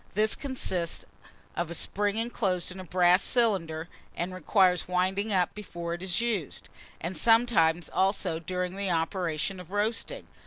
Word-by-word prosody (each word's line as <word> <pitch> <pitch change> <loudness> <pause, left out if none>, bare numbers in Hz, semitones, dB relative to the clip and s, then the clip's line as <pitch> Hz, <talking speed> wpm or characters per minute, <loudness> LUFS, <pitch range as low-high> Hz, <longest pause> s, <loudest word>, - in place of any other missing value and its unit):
This 215 +1 +2
consists 190 - -2 0.5
of 175 -1 -2
a 170 - -4
spring 205 +5 0
inclosed 200 -7 -1
in 185 - -9
a - - -6
brass 180 +1 +4
cylinder, 175 -10 +1 0.3
and 180 +2 -3
requires 185 0 +2
winding 190 +4 0
up 180 -3 +2
before 170 -5 -6
it 175 - -6
is 185 -2 0
used, 220 - -2 0.3
and 175 +3 -4
sometimes, 225 -8 +3
also, 190 -4 0
during 180 +2 -3
the 200 -1 -1
operation 170 +1 -1
of 180 -2 -11
roasting. 210 +3 -2
185 Hz, 150 wpm, -28 LUFS, 175-205 Hz, 0.5 s, brass